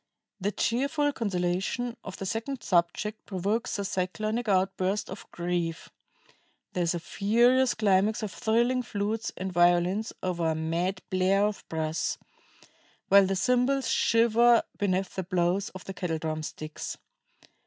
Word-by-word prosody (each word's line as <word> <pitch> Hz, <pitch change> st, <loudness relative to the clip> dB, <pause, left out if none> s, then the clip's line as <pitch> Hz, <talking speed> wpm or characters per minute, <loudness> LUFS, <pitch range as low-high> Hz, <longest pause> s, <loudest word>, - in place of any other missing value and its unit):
The 200 Hz, +2 st, -1 dB
cheerful 280 Hz, +7 st, 0 dB
consolation 195 Hz, +3 st, -1 dB
of 190 Hz, -, -8 dB
the 195 Hz, -, -5 dB
second 230 Hz, +5 st, -3 dB
subject 180 Hz, +5 st, 0 dB
provokes 205 Hz, +5 st, -1 dB
a 200 Hz, -, -2 dB
cyclonic 215 Hz, +6 st, -2 dB
outburst 190 Hz, +1 st, 0 dB
of 190 Hz, -, -9 dB
grief; 170 Hz, -1 st, -3 dB, 0.8 s
there 180 Hz, -, -1 dB
is 170 Hz, +1 st, +1 dB
a -, -, -2 dB
furious 240 Hz, +8 st, +3 dB
climax 210 Hz, +1 st, +2 dB
of 210 Hz, -, -3 dB
thrilling 240 Hz, +5 st, +1 dB
flutes 220 Hz, -1 st, -2 dB
and 190 Hz, 0 st, -4 dB
violins 175 Hz, +5 st, +3 dB
over 175 Hz, -3 st, 0 dB
a 160 Hz, -, 0 dB
mad 170 Hz, +4 st, -2 dB
blare 190 Hz, +2 st, +3 dB
of 210 Hz, -1 st, -3 dB
brass, 160 Hz, 0 st, -1 dB
the -, -, -31 dB, 0.8 s
while 200 Hz, 0 st, +7 dB
the 195 Hz, -, 0 dB
cymbals 250 Hz, +6 st, +2 dB
shiver 235 Hz, +1 st, +4 dB, 0.2 s
beneath 190 Hz, -2 st, 0 dB
the 190 Hz, -, -2 dB
blows 180 Hz, +2 st, 0 dB
of 185 Hz, -, -11 dB
the 195 Hz, -, -6 dB
kettle 175 Hz, -4 st, -2 dB
drum 155 Hz, 0 st, -3 dB
sticks. 155 Hz, 0 st, -6 dB
195 Hz, 145 wpm, -28 LUFS, 180-225 Hz, 0.8 s, while